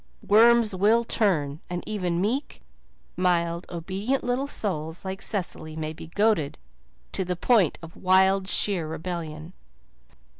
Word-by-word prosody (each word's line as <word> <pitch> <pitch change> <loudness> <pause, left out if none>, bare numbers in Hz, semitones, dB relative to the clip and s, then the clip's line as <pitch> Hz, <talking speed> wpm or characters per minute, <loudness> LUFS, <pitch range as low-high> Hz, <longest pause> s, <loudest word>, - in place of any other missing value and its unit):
Worms 230 0 +5
will 215 +5 +3
turn, 155 -11 +1
and 175 0 -4
even 180 -5 -2
meek, 240 +9 -2 0.5
mild, 170 -1 0
obedient 195 +10 -2
little 245 +3 -1
souls 165 - -2
like 190 +2 -5
Cecily 175 -7 -3
may 155 0 -4
be 160 - -10
goaded 200 -5 +1 0.5
to - - -2
the 180 0 -2
point 195 - +2
of 165 +1 -11
wild, 190 +1 +3
sheer 190 -5 +2
rebellion. 160 0 -6
185 Hz, 125 wpm, -25 LUFS, 165-210 Hz, 0.5 s, Worms